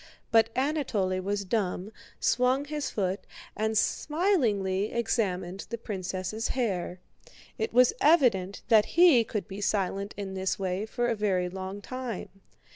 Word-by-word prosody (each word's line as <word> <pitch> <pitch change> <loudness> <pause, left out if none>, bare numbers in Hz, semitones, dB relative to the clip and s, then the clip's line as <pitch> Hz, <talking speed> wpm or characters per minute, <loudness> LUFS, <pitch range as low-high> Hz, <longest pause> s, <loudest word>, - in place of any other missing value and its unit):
But 225 -1 +5
Anatole 250 -10 0
was 200 +1 -2
dumb, 190 -1 -1 0.3
swung 255 +3 +2
his 295 -2 -3
foot, 195 -1 -1 0.4
and 220 0 0
smilingly 220 - +1
examined 195 -6 -1
the 235 - -3
princess' 195 0 -4
hair. 190 -8 -2 0.6
It 220 - -1
was 250 - +5
evident 230 - +3
that 220 -2 +6
he 335 -9 +7
could 210 -2 -4
be 200 0 -7
silent 200 0 -1
in 195 -2 -5
this 190 0 -1
way 190 +2 -2
for 240 +2 -1
a 235 - +1
very 190 -4 0
long 190 +2 -6
time. 255 -3 -5
210 Hz, 135 wpm, -28 LUFS, 190-245 Hz, 0.6 s, he